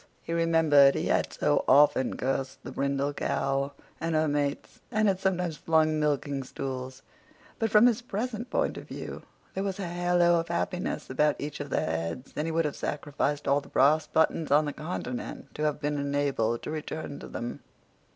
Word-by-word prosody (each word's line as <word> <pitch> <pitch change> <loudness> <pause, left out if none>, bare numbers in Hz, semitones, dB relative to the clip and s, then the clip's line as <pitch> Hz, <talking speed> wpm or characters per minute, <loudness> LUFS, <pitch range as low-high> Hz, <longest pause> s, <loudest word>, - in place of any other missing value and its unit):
He 165 - -4
remembered 160 -4 +5
he - - -1
had - - +1
so - - +1
often 145 -2 +4
cursed 135 +1 -2
the - - -7
brindle 140 +1 -1
cow 140 0 -1 0.3
and 165 0 -1
her 155 0 +3
mates, 145 -1 -2
and 215 0 +2
had 190 -2 +2
sometimes 180 -4 0
flung 155 0 +2
milking 145 -2 0
stools. 130 0 -6 0.6
But, 225 -1 +1
from 210 +2 +6
his 245 -1 +3
present 235 +1 -4
point - - 0
of - - -9
view, - - -7 0.3
there 190 - -2
was 195 -2 -2
a 195 - -2
halo 175 0 +3
of 165 - -3
happiness 175 -3 -2
about 150 +3 +2
each 150 0 -5
of 145 -1 -5
their - - 0
heads, 85 +10 -3
and 150 +2 -1
he - - -1
would 165 0 +1
have 150 - -2
sacrificed 145 0 -2
all 140 +1 +3
the - - -15
brass 150 +3 +4
buttons 160 0 +1
on 150 +2 +4
the 145 - -3
continent 145 -6 -5
to 155 - -2
have 150 -1 0
been 145 0 -1
enabled 140 -5 0
to - - -4
return 155 -1 -5
to - - -9
them. 120 - -5
150 Hz, 190 wpm, -28 LUFS, 140-165 Hz, 0.6 s, from